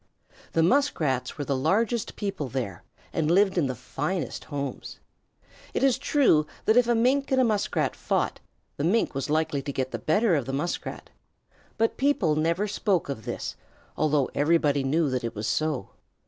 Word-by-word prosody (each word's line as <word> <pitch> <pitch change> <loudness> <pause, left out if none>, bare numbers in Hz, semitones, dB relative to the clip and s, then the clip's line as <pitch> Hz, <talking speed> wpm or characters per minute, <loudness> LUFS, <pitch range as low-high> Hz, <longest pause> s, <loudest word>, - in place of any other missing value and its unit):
The 165 - +3
Muskrats 160 - +1
were 145 - -3
the 140 - 0
largest 225 - 0
people 195 -8 -3
there, 120 -8 -4 0.3
and 155 -1 0
lived 190 +2 +4
in 165 -6 +2
the 130 - -3
finest 145 +4 -4
homes. 140 -2 -5 0.8
It - - 0
is 265 -4 +3
true 160 - +3 0.2
that 220 - +4
if 245 -1 +5
a 240 - +3
Mink 265 +5 +2
and 260 - +3
a - - +5
Muskrat 215 -4 0
fought, - - -1 0.4
the 140 - -2
Mink 205 +8 +2
was 135 +1 -3
likely 155 -2 +1
to 140 - -4
get 130 -1 -2
the - - -4
better 200 +6 +2
of 140 -5 -1
the 135 - -3
Muskrat, 150 +6 -4 0.7
but 225 0 +1
people 255 - +2
never 165 +6 +1
spoke 195 -5 0
of 115 -6 -5
this, - - -4 0.4
although 150 -3 +1
everybody 145 -2 +2
knew 155 +4 +2
that 130 -1 -1
it 115 - -4
was 105 +1 -4
so. 140 -1 -1
155 Hz, 175 wpm, -26 LUFS, 140-210 Hz, 0.8 s, if